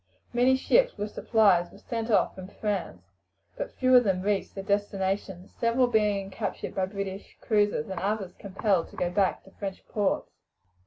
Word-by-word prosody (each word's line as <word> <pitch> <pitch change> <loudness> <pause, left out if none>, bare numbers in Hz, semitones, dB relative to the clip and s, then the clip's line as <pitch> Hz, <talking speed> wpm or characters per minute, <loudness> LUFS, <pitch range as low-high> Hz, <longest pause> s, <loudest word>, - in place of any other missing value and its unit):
Many 250 +2 +4
ships - - +3
with 210 +1 -3
supplies 200 -6 +3
were - - -14
sent 230 -1 -4
off 215 - +3
from 185 -1 -9
France, 195 - -3 0.5
but - - -4
few 255 0 +4
of 250 - +8
them 190 -3 0
reached 205 -1 -1
their 195 - -5
destination; 195 -2 -1
several 235 +2 +3
being 210 -4 +1
captured 200 0 -4
by 190 -1 0
British 195 0 -6
cruisers, 205 -8 +1
and 190 -2 -4
others 195 -1 -2
compelled 195 -2 0
to - - -15
go 175 - -1
back 195 0 +1
to 195 - -17
French 195 -1 -7
ports. 205 -2 -1
200 Hz, 170 wpm, -28 LUFS, 190-220 Hz, 0.5 s, of